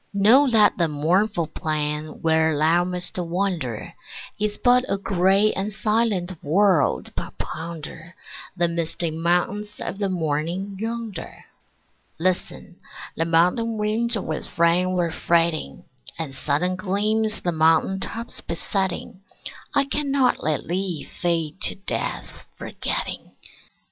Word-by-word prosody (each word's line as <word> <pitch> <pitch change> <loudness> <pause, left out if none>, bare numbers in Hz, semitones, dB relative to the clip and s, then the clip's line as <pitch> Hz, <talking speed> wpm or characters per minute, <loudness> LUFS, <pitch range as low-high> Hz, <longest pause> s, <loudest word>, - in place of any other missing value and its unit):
Know 240 +8 +6
that 215 -5 +4
the 170 - +3
mournful 170 +5 +1
plain 150 0 -3
where 160 -1 +3
thou 165 +4 +4
must 180 0 -4
wander 170 - -2 0.5
Is 210 0 -1
but 250 0 +4
a 195 - +1
gray 195 +2 +3
and 195 +2 -2
silent 210 -5 0
world, 160 - +2
but - - -6
ponder 165 +1 -7 0.4
The 175 -1 +3
misty 170 0 -2
mountains 180 +6 -1
of 195 - -5
the 200 -2 0
morning 170 +3 -2
yonder. 225 -5 -5 0.7
Listen: 180 0 -2 0.4
the 165 - 0
mountain 180 +8 +2
winds 220 +2 +1
with 160 -6 -5
rain 175 +2 +3
were 175 -2 0
fretting, 165 -1 0 0.3
And 160 -5 -4
sudden 150 +7 0
gleams 215 +3 0
the 175 - 0
mountain 160 +4 +3
tops 230 +4 -5
besetting. 190 +2 -2 0.5
I 280 -1 +4
cannot 280 -2 +1
let 155 -1 -1
thee 180 -2 -2 0.2
fade 170 0 0
to - - +1
death, 195 - -5
forgetting. - - -4
180 Hz, 120 wpm, -23 LUFS, 165-210 Hz, 0.7 s, Know